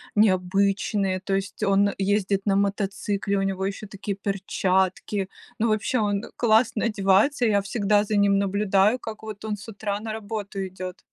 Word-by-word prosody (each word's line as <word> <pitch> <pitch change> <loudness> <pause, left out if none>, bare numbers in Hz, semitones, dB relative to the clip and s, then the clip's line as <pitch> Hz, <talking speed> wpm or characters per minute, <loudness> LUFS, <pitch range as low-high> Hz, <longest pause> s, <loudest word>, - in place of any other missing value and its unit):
необычные, 195 -1 +2
то 195 0 -1
есть 195 +2 -4
он 200 0 +3
ездит 195 0 +1
на 195 -1 +2
мотоцикле, 200 0 -1
у - - +1
него 190 -1 -1
еще 200 +1 -4
такие 200 0 -5
перчатки. 190 0 -1 0.3
Ну, 230 +1 +1
вообще 220 +3 +1
он 205 -1 0
классно 225 -1 +3
одевается, 215 +5 +3
я 205 -2 +3
всегда 205 0 +1
за 210 0 -1
ним 200 -1 +4
наблюдаю, 200 +3 +2
как 220 -1 -8
вот 215 -1 -7
он 210 -1 -2
с 195 - -12
утра 205 -1 -3
на 220 0 -5
работу 210 -2 -4
идет. 185 0 -7
200 Hz, 160 wpm, -25 LUFS, 195-215 Hz, 0.3 s, ним